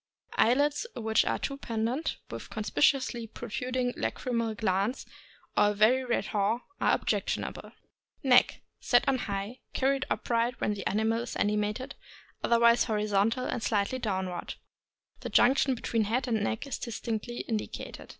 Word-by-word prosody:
Eyelids 285 - +3
which 220 -1 +2
are - - 0
too 275 - -3
pendent, 235 +6 -2
with - - -7
conspicuously 235 +2 +1
protruding 245 +3 -3
lachrymal 230 -3 -2
glands, 205 +3 0 0.5
or - - +5
a - - 0
very 235 +6 +4
red 240 -2 0
haw, 215 +3 0 0.2
are - - +4
objectionable. - - -2 0.5
Neck. 255 -2 +4
— - - -53
Set 245 - +5
on 265 -1 +2
high, 200 -4 -2
and 240 +5 -10 0.2
carried 270 0 +1
upright 235 +1 0
when 210 - 0
the 200 -2 -5
ani 215 +3 +1
mal 225 +1 +1
is 240 - -6
animated, 210 +4 -1 0.5
otherwise 235 0 +5
horizontal 215 +2 +1
or 250 - -2
slightly 220 +3 0
down 190 -5 -1
ward. 175 -1 -5 0.6
The - - -5
junction 265 +1 +4
between 225 -2 0
head 250 +5 0
and 220 -3 0
neck 220 +5 -2
is 275 - -4
distinctly 235 0 -4
indicated. 220 -2 -5
230 Hz, 150 wpm, -29 LUFS, 210-250 Hz, 0.6 s, or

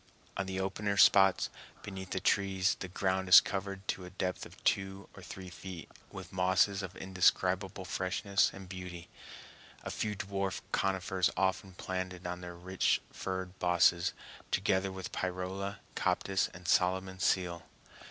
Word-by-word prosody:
On 95 - -2
the 95 0 -3
opener 100 +1 -1
spots 95 -2 +6 0.3
beneath 95 -2 -7
the 95 - -1
trees 95 0 +2
the 95 - -4
ground 95 +1 -1
is 90 - +12
covered 95 0 -4
to 95 - -1
a 90 - -8
depth 90 0 -3
of - - -18
two 95 0 0
or - - -11
three 95 -1 -9
feet 90 -2 -9 0.2
with 95 -1 -9
mosses 95 +2 +3
of 95 -2 -7
indescribable 95 +1 +1
freshness 95 +2 +1
and 95 -1 -10
beauty, 90 -2 -8 0.7
a - - -4
few 105 -1 -2
dwarf 95 -1 -3
conifers 95 -1 +1
often 95 0 0
planted 95 0 -4
on 90 0 -4
their 90 -1 -7
rich 90 +2 +1
furred 95 0 -4
bosses, 85 -1 +3 0.4
together 95 +1 +1
with 95 -1 -6
pyrola, 95 +2 -3 0.2
coptis, 95 +1 +1
and 90 0 -11
Solomon's 95 +1 +1
seal. 90 -2 +1
95 Hz, 145 wpm, -32 LUFS, 90-95 Hz, 0.7 s, is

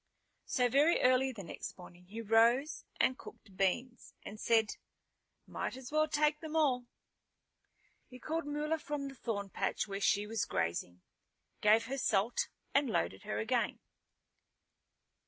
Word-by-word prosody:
So 250 -2 +2
very 285 +7 +4
early 255 +1 +4
the 215 -6 -8
next 170 - -7
morning 180 0 -13
he 215 +5 -7
rose 235 +8 +3
and 260 - +2
cooked 200 -3 -13
beans, 240 +7 -1
and 215 - -8
said, 225 -2 +2 0.7
"Might - - -4
as 260 0 -9
well 310 0 +3
take 300 0 +2
them 315 -1 -6
all." 260 -6 +2 1.2
He 250 - -11
called 315 +4 -3
Mula 300 +2 -1
from 295 -2 -4
the - - -10
thorn 205 -5 -4
patch - - -1
where 195 0 -4
she 205 +1 +2
was 225 +1 -1
grazing, 85 - -2 0.6
gave 220 +2 +5
her 270 +3 -3
salt 220 0 +1 0.2
and 280 -2 +3
loaded 95 - -1
her 105 - -2
again. 110 - 0
240 Hz, 145 wpm, -33 LUFS, 205-285 Hz, 1.2 s, gave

